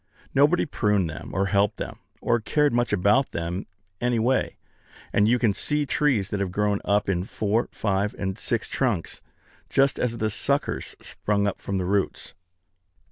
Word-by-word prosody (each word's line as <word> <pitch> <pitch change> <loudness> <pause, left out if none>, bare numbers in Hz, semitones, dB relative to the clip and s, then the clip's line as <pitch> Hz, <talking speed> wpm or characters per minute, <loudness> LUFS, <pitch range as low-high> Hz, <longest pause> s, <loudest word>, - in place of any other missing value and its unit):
Nobody 145 +6 +4
pruned 105 - +1
them, 80 - -8
or 95 +2 +1
helped 100 +1 +2
them, - - -6 0.2
or 120 0 +2
cared 150 +4 +1
much 120 0 +1
about 105 +7 +3
them 85 +3 -3 0.3
any 120 -1 +1
way; 125 +4 +1 0.6
and 105 - +4
you 120 +2 +4
can 115 -4 +2
see 150 +7 -1
trees 135 -8 +1
that 105 - -1
have 100 -2 -1
grown 105 +1 0
up 100 0 +1
in 90 -2 0
four, 105 +3 -1
five, 100 0 -1
and 95 -1 -2
six 115 +2 -2
trunks, 115 -11 -1 0.5
just 135 0 +2
as 120 -1 0
the 110 -1 0
suckers 140 +6 -1
sprung 100 -1 -1
up 100 - -2
from 100 - -2
the 90 - -1
roots. 100 +1 -1
105 Hz, 170 wpm, -25 LUFS, 100-125 Hz, 0.6 s, Nobody